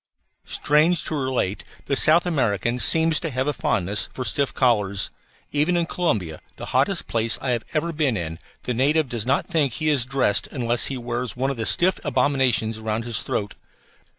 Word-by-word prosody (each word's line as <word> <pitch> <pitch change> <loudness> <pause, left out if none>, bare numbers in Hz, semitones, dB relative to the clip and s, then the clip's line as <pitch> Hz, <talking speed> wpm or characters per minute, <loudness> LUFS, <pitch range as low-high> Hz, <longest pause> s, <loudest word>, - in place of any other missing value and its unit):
Strange 155 +3 +2
to - - -3
relate, 130 -9 -2 0.2
the 140 - 0
South 160 +5 +5
American 120 - 0
seems 160 +3 +4
to 165 - -3
have 130 -1 -2
a 150 - 0
fondness 100 -5 -1
for 130 - -5
stiff 140 +2 0
collars. 105 -6 +1 0.4
Even 155 +5 +1
in 170 - +1
Corumba, 110 - -2 0.2
the - - -8
hottest - - +2
place 115 -1 +1
I 130 - -2
have 120 -2 -1
ever 165 +2 -1
been 145 -7 0
in, 80 -1 -5 0.2
the 125 - -2
native 145 +5 +2
does 120 -1 -4
not 140 - +1
think 150 -9 0
he 155 +5 -1
is 140 -5 +2
dressed 130 -5 +1
unless 120 -3 0
he 135 - -4
wears 120 0 -4
one 135 +2 -1
of 135 - -6
these 110 - -1
stiff 185 +2 +3
abominations 130 -6 +1
around 110 +1 -3
his 115 -2 +1
throat. 105 -1 -3
130 Hz, 185 wpm, -23 LUFS, 115-150 Hz, 0.4 s, South